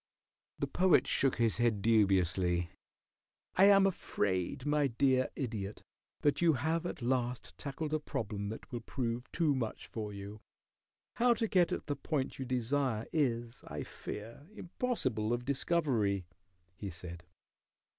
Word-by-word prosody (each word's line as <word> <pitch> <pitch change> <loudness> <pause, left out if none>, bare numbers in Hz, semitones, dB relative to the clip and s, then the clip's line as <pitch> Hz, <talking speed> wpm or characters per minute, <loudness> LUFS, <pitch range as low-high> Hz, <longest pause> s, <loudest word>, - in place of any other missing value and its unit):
The - - 0
Poet 185 -1 +4
shook 135 -2 +2
his 115 -2 +1
head 115 -5 +1
dubiously. 90 -5 +3 0.8
"I 190 - +7
am 200 -1 +7
afraid, 100 - -1
my 150 -1 +3
dear 130 +1 +2
Idiot, 110 -6 -4 0.4
that 145 +1 +2
you 170 -2 +5
have 160 +6 0
at 135 - -6
last 125 0 -1
tackled 150 +2 -4
a 155 - +2
problem 105 -7 -3
that 110 - -8
will 120 - -3
prove 120 0 -3
too 160 -4 +2
much 120 -5 -3
for 105 -2 -5
you. 100 +1 -8 0.8
How 240 0 +5
to 225 0 0
get 180 -4 +3
at - - -2
the 145 - -1
point 140 -4 -2
you 130 - -3
desire 125 -2 0
is, 120 -6 0
I - - -4
fear, 115 +8 -8
impossible 130 - -1
of 120 0 -2
discovery," 130 - +1 0.5
he 100 +1 -5
said. 85 -1 -8
125 Hz, 145 wpm, -33 LUFS, 105-150 Hz, 0.8 s, I